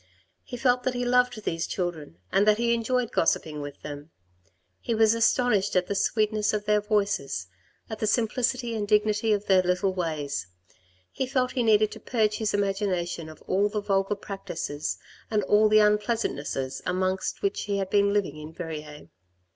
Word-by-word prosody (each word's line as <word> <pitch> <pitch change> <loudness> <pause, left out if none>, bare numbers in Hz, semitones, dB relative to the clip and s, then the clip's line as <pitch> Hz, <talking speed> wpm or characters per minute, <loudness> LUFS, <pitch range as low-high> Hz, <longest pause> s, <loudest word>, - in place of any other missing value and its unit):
He 245 - -7
felt 250 0 +2
that 250 0 -1
he 245 0 -1
loved 250 -2 +2
these 165 -2 -2
children 165 - -4
and 200 +2 +3
that 210 0 +5
he 235 0 +2
enjoyed 235 +1 0
gossiping 155 -2 0
with 145 0 -8
them. 145 +1 -8 0.7
He 230 - -2
was 220 0 +5
astonished 230 -3 +2
at 180 0 +3
the 200 - -2
sweetness 215 +1 +1
of 210 -1 -2
their 210 0 +3
voices, 205 - -1 0.4
at 220 -1 -6
the 215 - 0
simplicity 240 +2 0
and 210 -2 -2
dignity 215 +1 +2
of 205 -1 +1
their 190 -1 +5
little 180 +2 0
ways; 150 - -3 0.6
he 265 - -2
felt 255 -1 0
he 255 - -1
needed 215 -2 +4
to - - -9
purge 215 -3 0
his 220 -2 -1
imagination 190 -5 -1
of 155 - -13
all 200 +2 +1
the 210 0 -2
vulgar 195 0 0
practices 170 -7 -5 0.3
and 215 -2 +1
all 210 +3 +4
the 215 - +5
unpleasant 210 +2 +2
nesses 135 -2 -4
among 185 +1 0 0.2
which 400 -1 -1
he 200 -1 -1
had 195 -1 -3
been 200 0 +3
living 200 -7 0
in 155 +1 -8
Verrieres. 155 -3 -7
205 Hz, 180 wpm, -26 LUFS, 180-220 Hz, 0.7 s, that